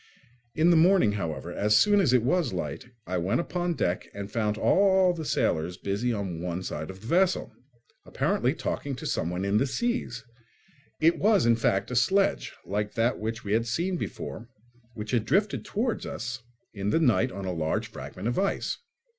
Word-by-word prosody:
In 165 +3 +4
the - - +5
morning, 170 - +5
however, 85 -5 -4
as 105 +3 +3
soon 205 0 +5
as 145 - +3
it 125 -3 +4
was 135 - +1
light, 80 - -4 0.2
I 90 +1 -2
went 95 +8 0
upon 175 0 -2
deck 90 -8 -1
and 100 0 -6
found 105 -2 0
all 190 - +4
the 165 -2 -5
sailors 85 - 0
busy 100 +6 -1
on 95 -7 -3
one 90 +1 -3
side - - -5
of 95 0 -9
the - - -13
vessel, 180 +8 +1 0.5
apparently - - 0
talking 140 -2 -3
to - - -8
someone 90 +3 -1
in 100 +1 +2
the 135 - +2
sea. 240 - -1 0.9
It 165 +2 +3
was, 205 - +4
in 120 0 +5
fact, 100 -1 0
a - - -2
sledge, 190 +11 +2
like 105 +3 -3
that 115 +2 +1
we 110 -2 -3
had 115 +1 +1
seen 175 +10 -1
before, 120 -7 -6 0.5
which 105 -1 -6
had 120 -4 +2
drifted 195 - +1
towards 230 +3 -2
us 120 +2 -5 0.3
in 100 -1 -2
the 160 - +2
night 120 - +3
on 95 +1 -6
a 90 - -2
large 80 -2 -1
fragment 95 +5 -7
of 120 - 0
ice. 195 0 -1
115 Hz, 185 wpm, -27 LUFS, -, 0.9 s, the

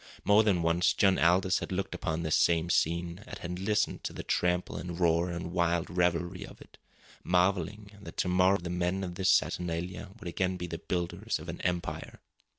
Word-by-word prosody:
More 105 +1 +6
than 100 -6 +2
once 85 +2 +3
John 95 -2 +3
Aldous 90 +3 +3
had - - -6
looked 95 +1 -2
upon 80 -1 -2
this 80 -1 0
same 85 0 +3
scene, 85 +3 0
and - - -7
had 90 0 -5
listened 105 +2 0
to - - -4
the - - -6
trample 90 0 0
and 85 -1 -6
roar 85 0 +2
and 85 0 -5
wild 85 -1 0
revelry 90 +1 0
of - - -12
it, - - -17 0.4
marvelling 95 +3 0
that - - -10
to - - 0
morrow 90 +2 +4
the 85 -1 -6
men 90 +2 -1
of 90 -2 -4
this 95 +1 0
saturnalia 90 +3 0
would 100 - -8
again 90 +2 -1
be 90 - -4
the 85 -1 -6
builders 90 +5 -2
of 80 +2 -9
an 85 - -6
empire. 90 -1 -3
90 Hz, 195 wpm, -30 LUFS, 85-95 Hz, 0.4 s, More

